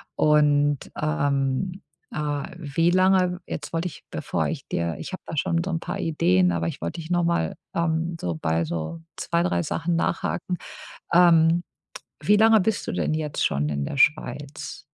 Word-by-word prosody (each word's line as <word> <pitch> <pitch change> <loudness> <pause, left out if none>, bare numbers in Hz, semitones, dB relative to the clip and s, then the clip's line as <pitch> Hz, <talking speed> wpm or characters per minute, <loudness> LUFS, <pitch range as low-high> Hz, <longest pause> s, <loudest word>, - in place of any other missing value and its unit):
Und, 145 -2 +3
ähm, 140 - 0 0.3
äh, 145 -2 -2
wie 165 +2 +1
lange 185 -1 +3
jetzt 150 +2 -6
wollte 165 +2 0
ich, - - -11
bevor - - -1
ich - - -4
dir 85 -1 -1
ich - - -6
habe - - -6
da 160 - -6
schon 170 +4 +1
so 190 - -3
'n 165 - -1
paar - - -5
Ideen, 90 - +2
aber 85 -1 -1
ich - - -4
wollte 85 - -4
dich 160 - -10
noch 175 -1 +2
mal, 170 0 0 0.2
ähm 170 0 0
so 85 -2 -2
bei 80 +1 0
so 85 - -4 0.2
2, 170 0 0
3 85 - 0
Sachen 165 +1 -1
nachhaken. 175 +1 -1 0.6
Ähm, 170 -1 +5 0.6
wie 210 - +4
lange 220 0 +6
bist 220 +2 0
du - - -1
denn - - 0
jetzt 155 -2 -1
schon 75 +2 0
in 70 -1 -2
der 140 - -5
Schweiz? 145 0 0
155 Hz, 175 wpm, -25 LUFS, 130-175 Hz, 0.6 s, lange